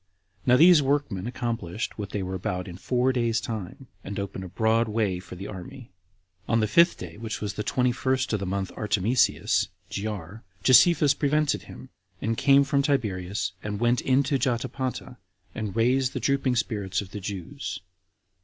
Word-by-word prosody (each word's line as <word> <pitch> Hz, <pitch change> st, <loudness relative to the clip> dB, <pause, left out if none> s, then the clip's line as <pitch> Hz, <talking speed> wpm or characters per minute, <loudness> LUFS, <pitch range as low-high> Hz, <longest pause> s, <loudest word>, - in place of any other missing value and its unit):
Now 125 Hz, 0 st, +6 dB
these 170 Hz, 0 st, +7 dB
workmen 135 Hz, -8 st, -1 dB
accomplished 115 Hz, -5 st, -3 dB
what 100 Hz, -2 st, -4 dB
they 100 Hz, -, -3 dB
were 95 Hz, 0 st, -4 dB
about 90 Hz, 0 st, -3 dB
in 90 Hz, -, -8 dB
four 125 Hz, +7 st, +1 dB
days' 115 Hz, -2 st, +1 dB
time, 110 Hz, +3 st, -6 dB, 0.2 s
and 100 Hz, +1 st, -5 dB
opened 100 Hz, -1 st, -5 dB
a -, -, -6 dB
broad 110 Hz, +4 st, +2 dB
way 105 Hz, -4 st, 0 dB
for 90 Hz, 0 st, -10 dB
the 95 Hz, +2 st, -7 dB
army. 115 Hz, +5 st, -9 dB, 0.6 s
On 115 Hz, -, +2 dB
the 110 Hz, -, +2 dB
fifth 170 Hz, -, +4 dB
day, 85 Hz, -2 st, -9 dB
which 110 Hz, 0 st, -5 dB
was 105 Hz, -2 st, -3 dB
the 105 Hz, -, -4 dB
twenty 125 Hz, +4 st, +1 dB
first 130 Hz, 0 st, -1 dB
of 105 Hz, -, +1 dB
the 95 Hz, -, -4 dB
month 95 Hz, 0 st, -2 dB
Artemisius, 105 Hz, +3 st, +1 dB, 0.2 s
[Jyar,] 100 Hz, 0 st, -5 dB, 0.2 s
Josephus 145 Hz, -, +6 dB
prevented 150 Hz, +1 st, +1 dB
him, 130 Hz, -, -11 dB, 0.3 s
and 115 Hz, +1 st, -1 dB
came 140 Hz, +3 st, +5 dB
from 140 Hz, 0 st, +1 dB
Tiberias, 105 Hz, -, -1 dB
and 105 Hz, -1 st, -4 dB
went 120 Hz, +1 st, +2 dB
into 135 Hz, +1 st, +2 dB
Jotapata, 125 Hz, 0 st, -2 dB, 0.4 s
and 110 Hz, -3 st, -4 dB
raised 125 Hz, +3 st, +2 dB
the -, -, -2 dB
drooping 135 Hz, 0 st, +1 dB
spirits 100 Hz, -5 st, -1 dB
of 95 Hz, -2 st, -10 dB
the 105 Hz, -, -5 dB
Jews. 100 Hz, +7 st, -6 dB
115 Hz, 170 wpm, -26 LUFS, 100-130 Hz, 0.6 s, these